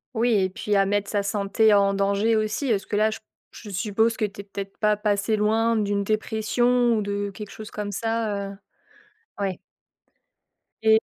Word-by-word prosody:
Oui, 235 Hz, +2 st, +2 dB
et 190 Hz, -2 st, +2 dB
puis 205 Hz, +1 st, -1 dB
à 195 Hz, -, +4 dB
mettre 205 Hz, +1 st, -1 dB
sa 205 Hz, -1 st, 0 dB
santé 205 Hz, +2 st, +2 dB
en 200 Hz, -1 st, +4 dB
danger, 200 Hz, +3 st, +2 dB
aussi. 215 Hz, +6 st, -1 dB
Est-ce 200 Hz, -5 st, 0 dB
que -, -, -2 dB
là, 215 Hz, +1 st, +3 dB
je 215 Hz, -, -6 dB, 0.3 s
je 215 Hz, -, -11 dB
suppose 215 Hz, +4 st, +1 dB
que -, -, -2 dB
tu 200 Hz, -1 st, -7 dB
es -, -, -14 dB
peut-être 195 Hz, -1 st, -7 dB
pas 210 Hz, -1 st, +3 dB
passée 210 Hz, +1 st, +1 dB
loin 225 Hz, +2 st, +2 dB
d'une 205 Hz, -2 st, 0 dB
dépression, 235 Hz, +3 st, +1 dB
ou -, -, 0 dB
de 200 Hz, 0 st, -2 dB
quelque 205 Hz, +1 st, -9 dB
chose 215 Hz, -1 st, -9 dB
comme 210 Hz, -1 st, -4 dB
ça, 215 Hz, -2 st, -2 dB
heu -, -, -10 dB, 0.9 s
ouais. 190 Hz, -3 st, -1 dB, 1.3 s
Et 220 Hz, 0 st, +6 dB
210 Hz, 185 wpm, -24 LUFS, 200-220 Hz, 1.3 s, Et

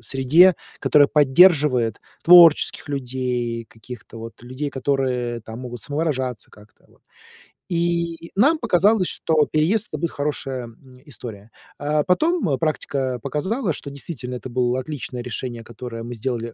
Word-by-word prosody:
среде, 135 Hz, -, +4 dB, 0.2 s
которая 145 Hz, -1 st, +4 dB
поддерживает 145 Hz, -, +4 dB, 0.2 s
творческих 170 Hz, -3 st, +6 dB
людей, 125 Hz, -3 st, -3 dB
каких-то 115 Hz, 0 st, -12 dB
вот 115 Hz, +1 st, -10 dB
людей, 130 Hz, +4 st, -5 dB
которые 130 Hz, -3 st, -1 dB
там 110 Hz, +1 st, -10 dB
могут 120 Hz, -2 st, -8 dB
самовыражаться 130 Hz, -6 st, -3 dB
как-то, 105 Hz, 0 st, -20 dB
вот. -, -, -27 dB, 0.7 s
И 170 Hz, -1 st, -2 dB
нам 285 Hz, +11 st, +4 dB
показалось, 210 Hz, -, +2 dB
что 155 Hz, -2 st, +1 dB
переезд- 165 Hz, +8 st, +1 dB
это 155 Hz, -, -3 dB
будет 170 Hz, 0 st, -2 dB
хорошая, 135 Hz, -3 st, -4 dB
м, 125 Hz, +3 st, -16 dB
история. 110 Hz, -5 st, -10 dB, 0.3 s
А, 150 Hz, +1 st, 0 dB
потом, 315 Hz, -, +1 dB
э, 135 Hz, -, +1 dB
практика 135 Hz, -4 st, -2 dB
показала, 175 Hz, -, -2 dB
что 140 Hz, -, -7 dB
действительно 130 Hz, -3 st, -6 dB
это 130 Hz, +1 st, -7 dB
было 125 Hz, +1 st, 0 dB
отличное 130 Hz, -2 st, -6 dB
решение, 120 Hz, -1 st, -5 dB
которое 115 Hz, 0 st, -8 dB
мы 120 Hz, +1 st, -7 dB
сделали 115 Hz, -1 st, -4 dB
135 Hz, 140 wpm, -22 LUFS, 120-160 Hz, 0.7 s, творческих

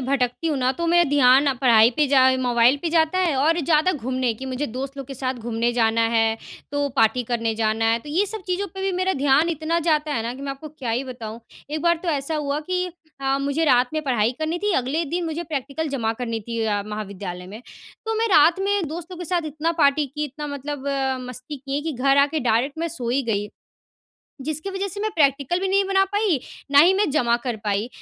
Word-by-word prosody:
भटकती 255 Hz, +2 st, -1 dB
हूँ 305 Hz, -3 st, 0 dB
ना 255 Hz, 0 st, +2 dB
तो 340 Hz, -, -1 dB
मेरा 345 Hz, +1 st, +4 dB
ध्यान 265 Hz, -1 st, +6 dB
ना 280 Hz, -, +3 dB
पढ़ाई 230 Hz, -3 st, +6 dB
पे 300 Hz, -1 st, +3 dB
जा 260 Hz, -1 st, +5 dB
मोबाइल 245 Hz, +1 st, +3 dB
पे 340 Hz, -, 0 dB
जाता 325 Hz, +2 st, +2 dB
है 345 Hz, -6 st, +2 dB
और 325 Hz, +5 st, +2 dB
ज़्यादा 315 Hz, +4 st, +2 dB
घूमने 255 Hz, -2 st, -1 dB
कि 265 Hz, +4 st, -8 dB
मुझे 260 Hz, +3 st, -3 dB
दोस्त 265 Hz, +4 st, -6 dB
लोग 275 Hz, -2 st, -6 dB
के 275 Hz, -, -7 dB
साथ 260 Hz, 0 st, -2 dB
घूमने 235 Hz, 0 st, -2 dB
जाना 230 Hz, -1 st, +2 dB
है 225 Hz, 0 st, +2 dB, 0.4 s
तो 285 Hz, 0 st, 0 dB
पार्टी 225 Hz, +2 st, +3 dB
करने 230 Hz, -2 st, 0 dB
जाना 220 Hz, 0 st, 0 dB
है। 230 Hz, -, +2 dB
तो 295 Hz, -, -12 dB
ये 355 Hz, +8 st, +1 dB
सब 420 Hz, 0 st, -5 dB
चीज़ों 370 Hz, +2 st, -1 dB
पे 385 Hz, -, -6 dB
भी 385 Hz, -1 st, 0 dB
मेरा 370 Hz, +1 st, +1 dB
ध्यान 285 Hz, +4 st, +3 dB
इतना 325 Hz, +1 st, -1 dB
जाता 300 Hz, -1 st, +1 dB
है 225 Hz, -, -1 dB
ना 235 Hz, +2 st, -4 dB
कि 275 Hz, -, -9 dB
मैं 280 Hz, -, -3 dB
आपको 290 Hz, +3 st, -10 dB
क्या 270 Hz, -5 st, -6 dB
ही 245 Hz, +4 st, -1 dB
बताऊँ। 235 Hz, -3 st, -7 dB, 0.3 s
एक 305 Hz, 0 st, -3 dB
बार 340 Hz, 0 st, +3 dB
तो 360 Hz, -, -3 dB
ऐसा 295 Hz, 0 st, -1 dB
हुआ 290 Hz, 0 st, -2 dB
कि 365 Hz, 0 st, 0 dB, 0.3 s
अ, 270 Hz, 0 st, +1 dB
मुझे 280 Hz, +3 st, 0 dB
रात 250 Hz, -4 st, +4 dB
में 310 Hz, -, -1 dB
पढ़ाई 240 Hz, -5 st, +1 dB
करनी 315 Hz, +2 st, -2 dB
थी। 415 Hz, -2 st, +1 dB
अगले 275 Hz, +6 st, 0 dB
दिन 340 Hz, +4 st, -2 dB
मुझे 325 Hz, +1 st, -3 dB
प्रैक्टिकल 300 Hz, +1 st, -3 dB
जमा 230 Hz, -5 st, -1 dB
करनी 230 Hz, -2 st, -2 dB
थी 230 Hz, +2 st, -5 dB
अ, 205 Hz, -2 st, 0 dB
महाविद्यालय 200 Hz, -4 st, -6 dB
में। 210 Hz, +5 st, -9 dB, 0.5 s
तो 445 Hz, -, 0 dB
मैं 455 Hz, -, +2 dB
रात 330 Hz, 0 st, +5 dB
में 400 Hz, -3 st, 0 dB
दोस्तों 345 Hz, +3 st, -7 dB
के 355 Hz, -, -6 dB
साथ 355 Hz, +1 st, 0 dB
इतना 310 Hz, +3 st, -2 dB
पार्टी 285 Hz, 0 st, +3 dB
की, 300 Hz, +3 st, -4 dB
इतना 295 Hz, +2 st, -6 dB
मतलब 285 Hz, -1 st, -6 dB
अ, 270 Hz, -1 st, 0 dB
मस्ती 255 Hz, +4 st, -7 dB
किए 275 Hz, +2 st, -4 dB
कि 320 Hz, 0 st, -3 dB
घर 275 Hz, +2 st, +2 dB
आके 290 Hz, +2 st, +2 dB
डायरेक्ट 250 Hz, +5 st, 0 dB
मैं 335 Hz, -, -1 dB
सो 255 Hz, -8 st, -5 dB
ही 270 Hz, +2 st, +1 dB
गई। 210 Hz, -3 st, -2 dB, 1.0 s
जिसकी 310 Hz, +5 st, -3 dB
वजह 390 Hz, +1 st, -3 dB
से 400 Hz, +2 st, -5 dB
मैं 435 Hz, -, 0 dB
प्रैक्टिकल 285 Hz, +2 st, +1 dB
भी 385 Hz, -, -1 dB
नहीं 395 Hz, +1 st, +3 dB
बना 385 Hz, 0 st, +3 dB
पाई, 405 Hz, -6 st, 0 dB, 0.3 s
ना 285 Hz, -, +7 dB
ही 355 Hz, +5 st, +7 dB
मैं 400 Hz, -4 st, +1 dB
जमा 235 Hz, -5 st, +2 dB
कर 245 Hz, -3 st, -2 dB
पाई। 205 Hz, +2 st, -1 dB
280 Hz, 235 wpm, -23 LUFS, 245-325 Hz, 1.0 s, ना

